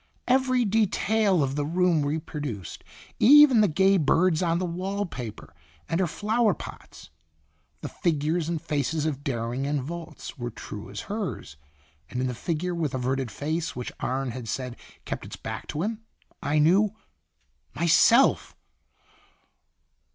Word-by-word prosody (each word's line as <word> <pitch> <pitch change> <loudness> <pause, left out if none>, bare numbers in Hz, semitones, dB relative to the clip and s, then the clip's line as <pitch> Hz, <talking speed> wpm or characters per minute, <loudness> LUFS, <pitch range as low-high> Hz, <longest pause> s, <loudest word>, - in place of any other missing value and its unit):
Every 255 -1 +3
de 215 +1 +3
tail 200 -5 +2
of 135 -1 -1
the 145 - 0
room 170 0 +2
reproduced, 145 - -4 0.4
even 280 -2 +8
the 210 - +5
gay 190 +4 +3
birds 165 +2 +3
on 170 -2 +1
the 180 - -1
wall 190 +4 -2
paper, 125 - -8 0.3
and 165 - -1
her 185 - +2
flower 215 +6 +1
pots. - - -11 0.7
The - - -4
figures 160 0 0
and 170 -2 -1
faces 150 0 -1
of 145 -3 -2
Dering 125 +1 -2
and 145 0 0
Volz 160 0 -7
were 120 0 -3
true 105 -3 -9
as 100 - -6
hers, 200 - -5 0.5
and 125 - -4
in 130 - 0
the 125 - -2
figure 170 +7 -2
with 155 -5 -2
averted 130 0 -1
face 155 +8 -3
which 125 - -5
Arne 130 0 -2
had 120 -1 -7
said 125 +1 -4 0.3
kept - - -4
its - - -8
back - - -7
to 155 +2 -3
him, 220 +2 -3 0.4
I 145 +1 0
knew 190 +7 +4 0.8
myself! 170 - +4
160 Hz, 150 wpm, -26 LUFS, 135-190 Hz, 0.8 s, even